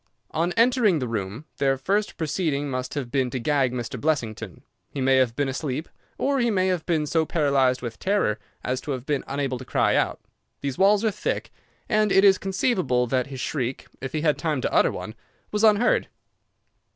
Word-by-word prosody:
"On 165 Hz, +3 st, 0 dB
entering 230 Hz, -5 st, +4 dB
the 130 Hz, -4 st, -2 dB
room 110 Hz, +4 st, -4 dB
their 135 Hz, -1 st, +2 dB
first 200 Hz, +10 st, -1 dB
proceeding 150 Hz, -3 st, -1 dB
must 130 Hz, +1 st, -4 dB
have 130 Hz, -5 st, -4 dB
been 130 Hz, -3 st, +1 dB
to 130 Hz, -, -3 dB
gag 135 Hz, 0 st, +1 dB
Mr. 120 Hz, -1 st, -5 dB
Blessington. 115 Hz, -, -2 dB, 0.3 s
He -, -, -6 dB
may 135 Hz, 0 st, +3 dB
have 125 Hz, -3 st, +2 dB
been 145 Hz, 0 st, 0 dB
asleep, 135 Hz, +2 st, -3 dB, 0.3 s
or 275 Hz, 0 st, +1 dB
he 240 Hz, -1 st, +2 dB
may 190 Hz, -3 st, +2 dB
have 180 Hz, -3 st, -2 dB
been 160 Hz, -4 st, +1 dB
so 160 Hz, +2 st, +1 dB
paralyzed 140 Hz, -5 st, +1 dB
with 115 Hz, -2 st, -6 dB
terror 190 Hz, -, +1 dB, 0.2 s
as 130 Hz, +1 st, -2 dB
to 145 Hz, -, -3 dB
have 130 Hz, -1 st, -6 dB
been 145 Hz, -2 st, -1 dB
unable 135 Hz, -2 st, -2 dB
to -, -, -7 dB
cry -, -, +1 dB
out. -, -, +1 dB, 0.4 s
These 140 Hz, -2 st, -3 dB
walls 200 Hz, +3 st, +4 dB
are 220 Hz, -, +3 dB
thick, 485 Hz, -, -3 dB, 0.4 s
and 215 Hz, -2 st, +2 dB
it 195 Hz, -, +5 dB
is 195 Hz, -2 st, +6 dB
conceivable 185 Hz, -, +1 dB
that 125 Hz, +1 st, 0 dB
his 135 Hz, -2 st, -7 dB
shriek, 130 Hz, -2 st, -3 dB, 0.2 s
if 135 Hz, -1 st, -5 dB
he 155 Hz, -, -1 dB
had 150 Hz, -2 st, +2 dB
time 155 Hz, -5 st, 0 dB
to -, -, -2 dB
utter -, -, +4 dB
one, -, -, -6 dB, 0.4 s
was 210 Hz, +1 st, -1 dB
unheard. 220 Hz, +2 st, +4 dB
145 Hz, 200 wpm, -25 LUFS, 130-185 Hz, 0.4 s, is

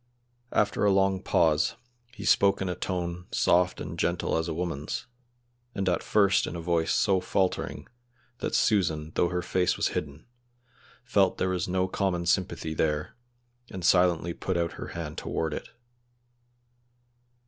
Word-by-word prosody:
After 105 Hz, 0 st, +1 dB
a 100 Hz, -, +5 dB
long 95 Hz, -1 st, +2 dB
pause 80 Hz, -5 st, +2 dB, 0.4 s
he -, -, -7 dB
spoke 100 Hz, 0 st, +4 dB
in 95 Hz, -, -2 dB
a 90 Hz, -, -1 dB
tone 90 Hz, -1 st, -4 dB
soft 90 Hz, +1 st, +2 dB
and -, -, -6 dB
gentle 85 Hz, 0 st, 0 dB
as 80 Hz, +1 st, 0 dB
a -, -, -2 dB
woman's, 85 Hz, -, -3 dB, 0.7 s
and 100 Hz, -1 st, -2 dB
at 90 Hz, -2 st, +1 dB
first 100 Hz, -3 st, +3 dB
in -, -, -5 dB
a -, -, -4 dB
voice 85 Hz, -1 st, 0 dB
so 95 Hz, -3 st, +3 dB
faltering 90 Hz, 0 st, -1 dB, 0.5 s
that -, -, -2 dB
Susan, 80 Hz, -7 st, +1 dB
though 85 Hz, -, +2 dB
her 90 Hz, -1 st, -2 dB
face 90 Hz, -1 st, +1 dB
was -, -, +1 dB
hidden, 75 Hz, +1 st, -5 dB, 0.8 s
felt -, -, +2 dB
there 95 Hz, -, 0 dB
was 90 Hz, -3 st, -1 dB
no 95 Hz, 0 st, 0 dB
common 95 Hz, -2 st, -1 dB
sympathy 85 Hz, -3 st, 0 dB
there, 75 Hz, -1 st, -1 dB, 0.5 s
and 90 Hz, -2 st, -5 dB
silently 90 Hz, -2 st, +3 dB
put 95 Hz, +1 st, -2 dB
out 85 Hz, -1 st, 0 dB
her -, -, -7 dB
hand 80 Hz, -2 st, -6 dB
toward 80 Hz, -1 st, -2 dB
it. -, -, -6 dB
90 Hz, 155 wpm, -27 LUFS, 85-95 Hz, 0.8 s, a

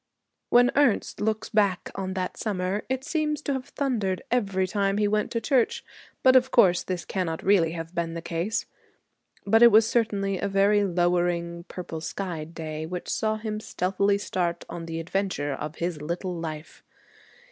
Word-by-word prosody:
When 245 Hz, +1 st, +5 dB
Ernest 280 Hz, -7 st, +2 dB
looks 215 Hz, 0 st, -1 dB
back 200 Hz, -4 st, +1 dB
on 190 Hz, -1 st, -4 dB
that 185 Hz, -1 st, -2 dB
summer 195 Hz, -1 st, -2 dB
it 260 Hz, 0 st, -1 dB
seems 300 Hz, 0 st, -1 dB
to 280 Hz, -, -1 dB
have 265 Hz, -1 st, -4 dB
thundered 220 Hz, -10 st, -1 dB
every 195 Hz, -6 st, +1 dB
time 195 Hz, +1 st, 0 dB
he 210 Hz, 0 st, +2 dB
went 210 Hz, 0 st, 0 dB
to 230 Hz, -, -1 dB
church. 250 Hz, 0 st, +1 dB, 0.4 s
But 260 Hz, 0 st, +6 dB
of 255 Hz, 0 st, +5 dB
course 190 Hz, -9 st, +5 dB
this 180 Hz, -2 st, -4 dB
cannot 170 Hz, -4 st, -3 dB
really 180 Hz, -5 st, +3 dB
have 165 Hz, 0 st, -6 dB
been 170 Hz, -1 st, -2 dB
the 170 Hz, -, -4 dB
case. 175 Hz, +6 st, -2 dB, 0.8 s
But 225 Hz, +3 st, +4 dB
it 235 Hz, 0 st, +9 dB
was 220 Hz, +1 st, +6 dB
certainly 200 Hz, -5 st, 0 dB
a 200 Hz, -, -1 dB
very 200 Hz, +1 st, +3 dB
lowering 175 Hz, -2 st, 0 dB
purple 170 Hz, -4 st, -7 dB
skied 165 Hz, -2 st, -5 dB
day 155 Hz, -1 st, -5 dB
which 180 Hz, +1 st, -5 dB
saw 215 Hz, -1 st, 0 dB
him 215 Hz, -1 st, -4 dB
stealthily 200 Hz, 0 st, 0 dB
start 175 Hz, -4 st, -2 dB
on 165 Hz, -1 st, -7 dB
the 165 Hz, 0 st, -4 dB
adventure 165 Hz, -4 st, -2 dB
of 150 Hz, +3 st, -5 dB
his 170 Hz, -3 st, -3 dB
little 175 Hz, +4 st, -3 dB
life. 160 Hz, -2 st, -7 dB
190 Hz, 170 wpm, -26 LUFS, 170-215 Hz, 0.8 s, it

